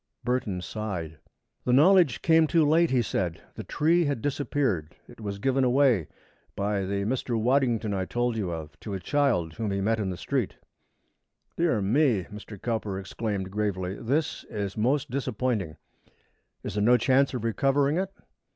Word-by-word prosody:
Burton 120 -7 -1
sighed. 90 -7 -5 0.4
"The 125 - +1
knowledge 165 0 +5
came 160 -1 +5
too 165 -1 +3
late," 165 +2 +4
he 125 -2 +2
said. 90 -5 -2
"The - - -7
tree 165 +3 +2
had 140 -4 -1
disappeared. 135 - -1
It 120 -2 -14
was 100 -2 -4
given 135 +5 +1
away, 125 - +3 0.5
by 100 -1 -1
the 100 +1 -1
Mr. 120 0 -1
Waddington 120 -3 +1
I 95 -1 -1
told 120 +3 -1
you 100 -5 -2
of, 80 -2 -7
to 105 -3 -5
a - - -3
child 110 - +1
whom 110 +2 -3
he 100 0 -1
met 110 +3 +1
in 100 -3 -1
the 90 - -4
street." 130 +2 -2 1.0
"Dear 160 - +1
me!" 115 -1 +2
Mr. 105 -1 -9
Cowper 110 -4 -2
exclaimed 95 0 -4
gravely. 95 -3 -2
"This 140 +8 -1
is 100 -2 -4
most 135 +6 0
disappointing. 125 - -2 0.9
Is - - -4
there 105 0 0
no 120 +3 +6
chance 130 +3 +2
of 120 - -4
recovering 140 +5 +2
it? 190 0 -2
115 Hz, 165 wpm, -27 LUFS, 100-135 Hz, 1.0 s, no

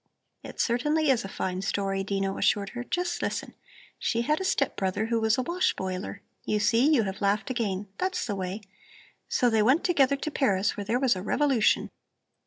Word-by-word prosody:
"It - - -10
certainly 295 +5 +2
is 250 - +1
a - - -5
fine 185 -1 -3
story," 195 0 -1
Dino 195 0 -1
assured 200 -2 +1
her; 245 0 -6
"just 355 +4 -2
listen: - - -3 0.5
She 230 +1 0
had 305 +7 +1
a - - -1
step 280 -7 0
brother 195 +2 -1
who 230 0 0
was 220 +2 +2
a 255 - 0
wash 350 +7 0
boiler 190 +1 -5 0.2
you 210 - 0
see, 230 +7 +3
you 265 -7 +4
have 195 0 -5
laughed 205 +5 +1
again! 205 -5 -2
That's 370 0 -1
the 220 - -2
way! 190 +2 -4 0.7
So 250 - +2
they 225 -2 +3
went 260 +10 +3
together 280 -6 +3
to 305 +2 -4
Paris, 200 -9 +1
where 205 - -5
there 230 +5 0
was 255 -5 +3
a 185 - -5
revolution." 265 +1 +2
225 Hz, 195 wpm, -27 LUFS, 195-275 Hz, 0.7 s, you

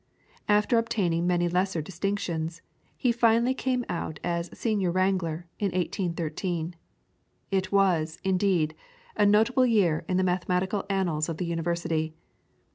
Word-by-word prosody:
After 210 +3 +4
obtaining 185 -7 0
many 175 -1 +2
lesser 180 0 0
distinctions, 170 -1 -3 0.3
he 250 - +2
finally 235 +1 +3
came 255 -2 -1
out 160 -3 -4
as 170 0 -1
Senior 210 -6 0
Wrangler 180 -2 0
in 205 - 0
1813. 175 -2 -2 0.8
It 190 -1 0
was, 175 -5 +2
indeed, 185 -5 +2 0.4
a 205 - +4
notable 225 +5 +4
year 195 -9 +2
in 185 - +2
the 185 - +2
mathematical 185 +2 0
annals 175 -5 0
of 165 - -3
the 180 - -2
University. 165 -1 -1
180 Hz, 125 wpm, -27 LUFS, 170-205 Hz, 0.8 s, After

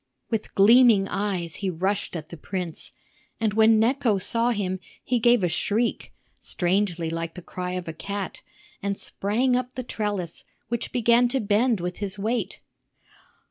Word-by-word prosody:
With 225 -2 -3
gleaming 220 -1 +6
eyes 190 -5 -2
he 195 - -2
rushed 190 +3 -1
at 160 -1 -6
the 170 - -8
prince; 180 0 -5 0.5
and 220 -2 +1
when 220 +1 +5
Necho 235 -2 +2
saw 230 +5 +1
him, 190 -5 -1 0.2
he 245 -1 +1
gave 240 -2 +4
a - - +4
shriek 215 +7 -1 0.3
(strangely 175 -2 0
like 165 0 -4
the 180 - -8
cry 180 +1 -5
of 180 -1 -4
a 165 - -4
cat) 200 +4 -5 0.4
and 200 0 -2
sprang 240 +6 0
up 250 0 -2
the 255 - -3
trellis, 205 -7 -3 0.3
which 235 0 -2
began 240 0 +4
to 265 +2 0
bend 220 +1 +2
with 180 +1 -4
his 200 -1 -3
weight. 225 +5 -2
205 Hz, 160 wpm, -25 LUFS, 180-235 Hz, 0.5 s, gleaming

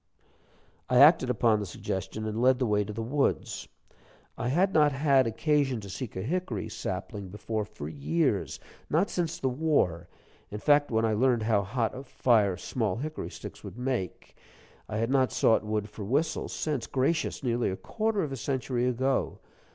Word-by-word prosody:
I 125 - +3
acted 145 -1 +7
upon 115 -3 +3
the 105 - -3
suggestion, 95 +4 -4
and 110 +1 -2
led 130 +1 +5
the 130 - 0
way 105 -2 +2
to 105 - -6
the 115 +2 -4
woods. 140 +5 -1 0.7
I - - -3
had 185 +7 +2
not 150 -2 +5
had 135 -2 +3
occasion 135 +1 +1
to 100 -2 -8
seek 125 +3 -6
a 95 - -3
hickory 165 - -2
sapling 100 -2 -5
before 105 +2 -3
for 75 -8 -8
years; 80 +2 -1 0.3
not 170 +7 +2
since 170 -2 -1
the 135 - -1
war, 125 - 0 0.4
in 105 - -5
fact, 145 +5 +3
when 110 -1 +1
I 110 - +1
learned 120 0 +2
how 110 -2 +2
hot 115 +3 -1
a 130 - -6
fire 110 -8 +2
small 105 +1 -2
hickory 155 +6 -5
sticks - - -10
would 100 +2 -9
make. 125 -7 -3 0.5
I 110 - -3
had 115 +3 0
not 130 -2 +3
sought 120 -4 +3
wood 105 -1 -2
for 105 0 -8
whistles 150 +9 -1
since 145 -7 -2
gracious, 140 +4 0
nearly 120 -1 +1
a 95 - -3
quarter 215 - -1
of 150 - -4
a 135 - -4
century 130 -1 -1
ago! 130 +2 0
125 Hz, 180 wpm, -28 LUFS, 105-140 Hz, 0.7 s, acted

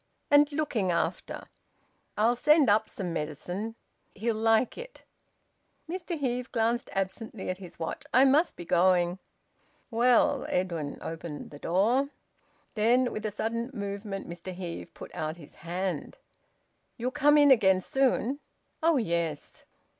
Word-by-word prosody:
And 290 +1 +6
looking 285 -10 -1
after. 170 - -2 0.7
I'll 225 +3 +3
send 295 -1 +5
up 215 +1 +2
some 180 -4 -4
medicine. 175 +8 -4 0.4
He'll 225 +3 0
like 225 +2 +2
it." - - -10 0.8
Mr 350 0 -4
Heve 250 -3 -2
glanced 235 +1 0
absently 195 +1 -3
at 185 - -6
his 180 -3 -11
watch. 165 - -4
"I 260 +2 +6
must 295 +6 +3
be 175 - -8
going." 175 +1 +3 0.7
"Well 240 +1 +3
" - - -8
Edwin 170 -5 -2
opened 160 -2 -6
the 145 - -10
door. 230 - +2 0.6
Then 245 +3 +3
with 215 0 -3
a - - -1
sudden 230 +3 -3
movement 200 -1 -5
Mr 170 +2 -7
Heve 175 -2 -6
put - - -10
out 155 +1 -3
his 150 -4 -13
hand. 175 -1 -4 0.8
"You'll 250 +1 -2
come 295 +1 +4
in 290 -1 +7
again 190 -7 +5
soon?" 265 +4 +1 0.4
"Oh 325 -1 +4
yes." 170 - -2
215 Hz, 140 wpm, -28 LUFS, 180-255 Hz, 0.8 s, in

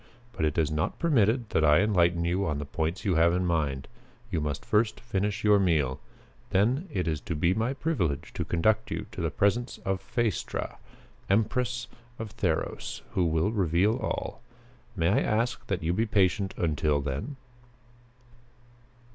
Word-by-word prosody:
But 80 - -1
it 75 - -1
is 80 -2 +2
not 75 0 -1
permitted 120 -7 +2
that 80 - +2
I 75 +3 +6
enlighten 85 -5 +2
you 90 +3 +1
on 75 -2 -1
the 75 - -4
points 80 +7 -3
you 95 - +2
have 85 +1 +5
in 90 0 0
mind. 75 -6 -1 0.4
You 80 - 0
must 75 -2 -3
first 110 +1 +1
finish 105 -2 -2
your 105 -1 +5
meal. 75 -8 +1 0.5
Then 115 - +2
it 90 - -1
is 80 -3 -1
to 85 - -4
be 85 +4 +2
my 115 +6 -1
privilege 95 - -1
to - - -2
conduct 110 +6 +1
you - - -3
to - - -6
the - - 0
presence 120 +5 0
of 95 -1 -1
Phaestra, 120 -4 -2 0.5
Empress 120 +4 +1 0.3
of 110 -2 -6
Theros, 80 - -2
who 90 - +1
will 80 +5 +1
reveal 100 +2 +2
all. 115 -1 -4 0.5
May 85 -3 +2
I 110 +8 +4
ask 120 +1 0
that 95 -3 -2
you 85 +2 +1
be 110 +5 +1
patient 100 -1 +1
until 75 -3 +1
then?" 70 - -4
95 Hz, 165 wpm, -28 LUFS, 80-110 Hz, 0.5 s, I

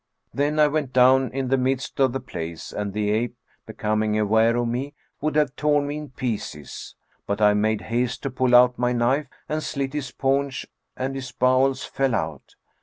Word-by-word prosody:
Then 145 +2 0
I 150 -1 +6
went 145 -3 -2
down 130 +1 +5
in 130 -1 -2
the 135 0 +2
midst 130 +1 -1
of 135 -2 +4
the 135 - -2
place 80 -9 -7
and 105 -1 -3
the 105 +1 -1
ape, 120 +3 -1 0.3
becoming 110 0 0
aware 110 +2 +3
of 120 0 0
me, 135 +5 -3 0.3
would 155 +1 -1
have 150 -4 +2
torn 145 -1 +2
me 145 +1 -3
in 150 -1 -7
pieces; 110 - -5 0.3
but 100 - -1
I 105 -1 +5
made 105 0 +1
haste 120 +2 -2
to 140 - -2
pull 125 -1 +2
out 125 0 +6
my 125 0 +1
knife 130 +4 +1 0.2
and 155 +1 -2
slit 140 -2 -3
his 145 -3 -3
paunch 135 0 -1 0.3
and 130 +1 -2
his 130 -1 -6
bowels 130 +2 +2
fell 135 -3 0
out. 80 -6 -4
130 Hz, 190 wpm, -24 LUFS, 110-135 Hz, 0.3 s, I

